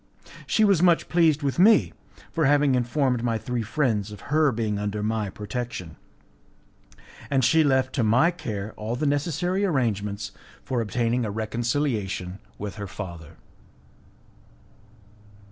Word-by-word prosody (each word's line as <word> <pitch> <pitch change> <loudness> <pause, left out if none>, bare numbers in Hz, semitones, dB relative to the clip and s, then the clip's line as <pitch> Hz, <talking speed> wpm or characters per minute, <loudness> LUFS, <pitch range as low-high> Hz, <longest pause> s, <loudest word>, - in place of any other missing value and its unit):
She 220 - +3
was 195 -5 +3
much 175 -2 +3
pleased 160 -4 +3
with 140 +3 -1
me 210 +3 +5 0.4
for 160 -2 +1
having 145 -1 +4
informed 125 0 +1
my 115 -2 0
three 125 +1 -3
friends 110 -4 -1
of 105 +7 -11
her 155 -2 +4
being 110 -3 -2
under 105 0 -3
my 110 -1 -1
protection, 105 -5 -6 1.3
and 135 -3 +2
she 160 +6 +5
left 130 -2 +2
to 125 - +1
my 125 +10 +4
care 110 - -5
all 110 +3 -3
the 150 - -2
necessary 165 +7 0
arrangements 105 - -1 0.3
for 125 -3 -1
obtaining 120 +2 0
a 110 - -2
reconciliation 110 -4 -2 0.2
with 105 0 -6
her 100 -1 -5
father. 85 -5 -8
120 Hz, 135 wpm, -25 LUFS, 105-145 Hz, 1.3 s, me